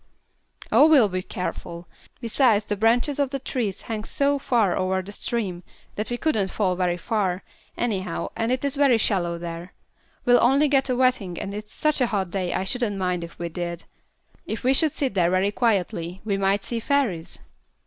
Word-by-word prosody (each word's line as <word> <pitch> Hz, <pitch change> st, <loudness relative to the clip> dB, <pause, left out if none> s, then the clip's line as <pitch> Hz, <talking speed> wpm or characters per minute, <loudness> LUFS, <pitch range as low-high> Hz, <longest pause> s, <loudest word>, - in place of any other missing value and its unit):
"Oh, 300 Hz, -, +7 dB
we'll 265 Hz, -10 st, +6 dB
be 185 Hz, 0 st, -2 dB
careful; 175 Hz, -2 st, -6 dB, 0.3 s
besides 230 Hz, -3 st, +2 dB
the 210 Hz, -, -2 dB
branches 240 Hz, +7 st, +2 dB
of 280 Hz, -2 st, +2 dB
the 275 Hz, -, -2 dB
trees 245 Hz, -7 st, -3 dB
hang 220 Hz, -2 st, -4 dB
so 280 Hz, +4 st, +1 dB
far 235 Hz, -9 st, +2 dB
over 190 Hz, 0 st, 0 dB
the 200 Hz, -, -9 dB
stream 200 Hz, -5 st, -2 dB, 0.3 s
that 210 Hz, -, -4 dB
we 240 Hz, -, -2 dB
couldn't 220 Hz, -10 st, 0 dB
fall 185 Hz, -3 st, 0 dB
very 180 Hz, -1 st, 0 dB
far, 190 Hz, -1 st, -1 dB, 0.3 s
anyhow, 190 Hz, -7 st, -2 dB
and 225 Hz, +1 st, -1 dB
it 255 Hz, +2 st, -1 dB
is 280 Hz, 0 st, 0 dB
very 275 Hz, -4 st, +4 dB
shallow 175 Hz, -6 st, 0 dB
there. 170 Hz, +1 st, -7 dB, 0.5 s
We'll 245 Hz, -1 st, +5 dB
only 275 Hz, +5 st, +4 dB
get 270 Hz, -1 st, +2 dB
a 255 Hz, -, +1 dB
wetting 245 Hz, -9 st, +1 dB
and 200 Hz, -, -5 dB
it's 210 Hz, +1 st, -7 dB
such 305 Hz, -3 st, 0 dB
a 250 Hz, -, +4 dB
hot 195 Hz, -5 st, -2 dB
day 185 Hz, -2 st, -2 dB
I -, -, -1 dB
shouldn't 210 Hz, 0 st, 0 dB
mind 180 Hz, -2 st, -1 dB
if 170 Hz, -, -10 dB
we 170 Hz, 0 st, -4 dB
did. 170 Hz, 0 st, -5 dB, 0.6 s
If 220 Hz, -, -4 dB
we 260 Hz, +2 st, +4 dB
should 310 Hz, +3 st, +3 dB
sit 270 Hz, -5 st, -2 dB
there 175 Hz, -3 st, +2 dB
very 185 Hz, +2 st, +2 dB
quietly 185 Hz, -6 st, -1 dB
we 205 Hz, -2 st, 0 dB
might 195 Hz, +1 st, +1 dB
see 235 Hz, +2 st, -3 dB
fairies." 230 Hz, -, -1 dB
210 Hz, 190 wpm, -24 LUFS, 185-250 Hz, 0.6 s, Oh